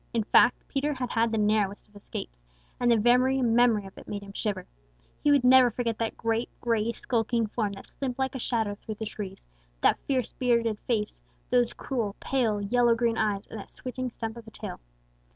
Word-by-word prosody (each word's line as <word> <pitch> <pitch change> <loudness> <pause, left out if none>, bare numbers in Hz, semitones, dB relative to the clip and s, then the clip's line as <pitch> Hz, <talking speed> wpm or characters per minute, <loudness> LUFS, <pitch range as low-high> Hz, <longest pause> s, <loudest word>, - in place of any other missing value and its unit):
In 225 - +2
fact, 245 +3 +4
Peter 290 +1 -1
had 250 -2 -3
had 230 0 +2
the 225 - 0
narrowest 210 -1 +1
of 210 - -28
escapes, - - -8 0.4
and 245 - +2
the 230 - +5
very 250 +4 +4
memory 230 -3 +3
of 195 - -11
it - - -14
made 205 -1 -5
him 200 0 -11
shiver. 210 -1 -3 0.6
He 295 - +4
never 255 0 +7
would 235 - -4
forget 230 -3 -1
that 230 -1 -2
great, 230 +1 -1
gray, 230 -1 +1
skulking 230 -1 0
form 210 -1 -2
that 195 - -10
slipped 260 -3 -5
like 265 -1 -1
a 260 - -4
shadow 225 -4 -1
through 215 +1 -7
the 220 - -5
trees, 195 -2 -7 0.4
that - - +4
fierce, 255 -4 0
bearded 235 -4 +1
face, 215 -4 -1 0.3
those 245 -1 +3
cruel, 225 -7 -3
pale 235 -6 0
yellow 235 +3 +3
green 230 -1 +1
eyes, 205 -2 0
or - - -7
that 200 - -9
switching 255 0 -5
stump 225 -1 -6
of 230 -1 -11
a - - -10
tail. - - -7
230 Hz, 205 wpm, -28 LUFS, 210-245 Hz, 0.6 s, never